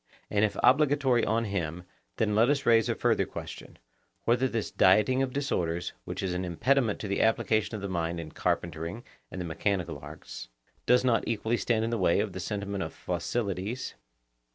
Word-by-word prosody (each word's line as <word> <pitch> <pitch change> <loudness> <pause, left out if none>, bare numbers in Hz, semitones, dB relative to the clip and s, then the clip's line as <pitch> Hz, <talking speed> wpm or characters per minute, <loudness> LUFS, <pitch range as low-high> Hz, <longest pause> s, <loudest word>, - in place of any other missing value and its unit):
And 105 0 +2
if 105 - +1
obligatory 140 -3 +4
on 115 +2 +1
him, 90 -4 -3 0.3
then 105 -1 +1
let 115 +4 +4
us 145 -1 +1
raise 115 -1 +4
a - - +1
further - - +1
question, - - -8 0.5
whether 120 +3 +2
this 115 -4 -3
dieting 105 +8 +4
of 135 -1 0
disorders, 90 -12 -1
which - - -4
is 95 -2 -1
an 90 +1 -2
impediment 115 +6 +1
to 105 - -4
the 100 - 0
application 110 0 +1
of 100 - -6
the - - -1
mind 85 -2 -2
in 80 -2 -7
carpentering 85 +7 -2 0.3
and 95 - -7
the 90 - -3
mechanical 90 +1 -2
arts, - - -9 0.4
does 125 +1 +4
not 120 -3 +2
equally 115 +1 0
stand 115 -2 +1
in 115 - -2
the 115 - -1
way 90 -1 +3
of 105 -2 -1
the - - -5
sentiment 100 +1 -3
of 80 - -5
Phocylides? 100 +5 -3
105 Hz, 185 wpm, -29 LUFS, 90-120 Hz, 0.5 s, obligatory